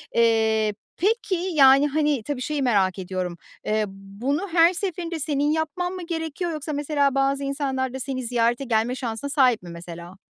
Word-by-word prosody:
Eee, 220 -2 +3 0.2
peki, 405 0 +1
yani, 295 -6 +5
hani, 295 -4 0
tabii 275 0 -4
şeyi 295 +2 -2
merak 195 -6 +2
ediyorum. 180 -2 -4 0.3
Eee, 215 0 +1
bunu 200 - -4
her 340 +1 +5
seferinde 345 -3 -3
senin 295 0 0
yapman 320 +3 -1
mı 365 -2 -6
gerekiyor 330 +1 -3
yoksa 305 0 -4
mesela 285 -1 +1
bazı 275 +1 +1
insanlar 270 -2 -2
da 265 - -5
seni 255 -1 -3
ziyarete 240 +1 +1
gelme 235 0 +1
şansına 245 +2 -4
sahip 255 -7 +3
mi 175 - -9
mesela? 170 +1 -9
275 Hz, 165 wpm, -24 LUFS, 225-305 Hz, 0.3 s, yani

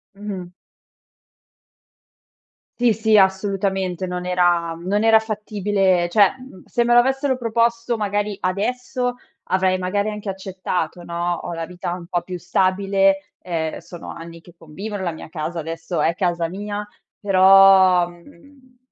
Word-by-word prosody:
Mh. 195 -3 -7 2.3
Sì, 240 -2 +4
sì, 220 +1 +2
assolutamente, 190 -1 +1
non 180 0 -4
era 175 -2 +1
non 200 +5 -1
era 225 0 +6
fattibile 205 -4 0
cioè, 200 +1 +4
mhmm, 255 -8 -13
se 240 - 0
me 240 - +2
lo 240 - +8
avessero 265 +1 +1
proposto, 235 0 0
magari, 205 -1 -1
adesso, 245 +6 -2 0.3
avrei, 185 0 +1
magari, 200 +3 -1
anche 210 -1 -6
accettato, 185 -3 -4
no, 170 +1 -2
ho 175 - -5
la 165 -1 -5
vita 180 -1 -5
un 175 -1 -8
po' 175 0 -2
più 180 0 -6
stabile, 195 +2 +1
ehm, 165 -3 -3
sono 175 - -10
anni 165 0 -10
che 175 0 -18
convivo 190 +7 -8
nella 190 -3 -2
mia 160 -1 -10
casa, 165 +1 -4
adesso 165 +2 -4
è 165 - +2
casa 175 -3 0
mia, 205 +3 -5 0.3
però, 190 -2 +6
mhmm 250 +10 -19
190 Hz, 140 wpm, -21 LUFS, 175-210 Hz, 2.3 s, lo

